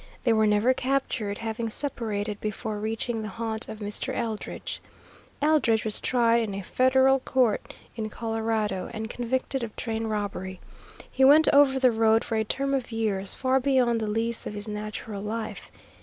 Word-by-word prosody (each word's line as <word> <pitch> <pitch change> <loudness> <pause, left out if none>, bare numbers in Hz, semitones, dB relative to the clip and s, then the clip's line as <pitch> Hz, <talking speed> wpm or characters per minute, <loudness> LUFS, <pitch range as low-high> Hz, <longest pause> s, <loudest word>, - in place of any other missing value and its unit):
They 235 - +4
were 220 -1 +3
never 210 +5 +4
captured, 255 -6 -1
having 225 0 -3
separated 215 -5 -3
before 215 0 -3
reaching 225 +2 -2
the 215 - -4
haunt 225 +1 -4
of 220 - -6
Mr. 205 -1 -4
Eldridge. 220 -2 -4 0.6
Eldridge 250 -8 +3
was 215 - -2
tried 235 -2 +3
in 210 -3 -3
a 195 - -5
Federal 265 +4 +4
court 250 -4 0 0.2
in 220 -2 -3
Colorado 220 -3 -2
and 220 +1 -4
convicted 260 +2 -2
of 230 -2 -5
train 225 -1 -3
robbery. 195 -3 -3 0.5
He 265 - +1
went 295 +4 +7
over 280 -2 +5
the 255 -1 +5
road 225 0 +3
for 225 - -3
a 220 - +2
term 275 +5 -1
of 260 -3 -1
years 205 -4 0
far 260 0 +2
beyond 250 -4 +2
the 215 - -1
lease 225 +2 -1
of 210 - -6
his 205 +1 -5
natural 210 -1 -5
life. 220 +1 -5
225 Hz, 170 wpm, -26 LUFS, 215-255 Hz, 0.6 s, went